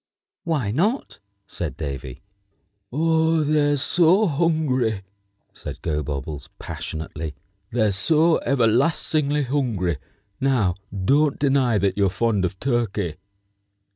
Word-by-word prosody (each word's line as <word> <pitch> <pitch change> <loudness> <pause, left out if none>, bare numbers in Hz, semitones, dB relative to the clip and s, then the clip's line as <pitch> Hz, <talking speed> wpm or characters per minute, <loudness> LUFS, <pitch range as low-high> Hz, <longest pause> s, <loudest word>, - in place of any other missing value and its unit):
"Why 145 -11 0
not?" 205 - 0 0.3
said 75 -6 -5
Davy. 70 -4 -6 0.7
"Oh, 160 +2 +2
they're 145 -1 +2
so 175 +8 +3
hungry!" 140 - +1 0.5
said - - -8
Gobobbles, 75 -2 -3
passionately. 80 -1 -6 0.3
"They're 110 -3 +2
so 160 - +3
everlastingly 140 +4 +1
hungry. 115 - -1 0.4
Now 125 -9 +2 0.3
don't 145 +3 +3
deny 135 -5 +2
that 95 -1 0
you're 100 -1 +4
fond 100 0 +1
of 95 +1 -4
turkey." 110 - -1
125 Hz, 100 wpm, -23 LUFS, 95-150 Hz, 0.7 s, you're